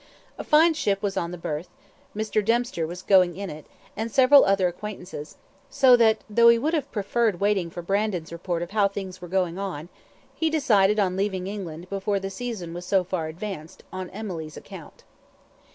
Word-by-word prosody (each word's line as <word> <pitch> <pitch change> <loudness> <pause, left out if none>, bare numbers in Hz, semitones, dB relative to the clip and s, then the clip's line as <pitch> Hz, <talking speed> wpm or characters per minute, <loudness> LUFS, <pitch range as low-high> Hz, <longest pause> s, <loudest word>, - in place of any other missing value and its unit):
A - - -1
very - - -23
fine 320 +2 +6
ship 200 -10 -1
was 200 -1 -1
on 170 - -1
the 180 - -7
berth; 160 +1 -5 0.5
Mr. 215 0 0
Dempster 230 -7 0
was 180 +2 -8
going 180 -3 +4
in 200 -3 -5
it, 150 0 -10 0.3
and 225 +2 -3
several 270 +3 +7
other 195 -2 +3
acquaintances; 180 -4 -7 0.3
so 265 -3 +6
that, 220 -2 +3
though 235 +2 +5
he 235 - +6
would 300 +8 -1
have 305 -5 -1
preferred 210 -1 0
waiting 200 -4 +1
for 175 +1 -8
Brandon's 195 -3 -1
report 170 0 -3
of 175 - -8
how 205 -2 +3
things 190 -2 -7
were 175 - -7
going 180 0 -1
on, 175 -5 -5 0.4
he 320 - 0
decided 215 -10 +3
on 185 -3 +1
leaving 190 -1 -1
England 180 -4 -6
before 200 +1 -1
the 195 0 -5
season 195 -5 -5
was 175 +1 -6
so 190 +1 +2
far 180 -3 -3
advanced, 170 0 -7
on 185 -1 -5
Emily's 175 -7 -6
account. - - -12
195 Hz, 190 wpm, -25 LUFS, 175-215 Hz, 0.5 s, several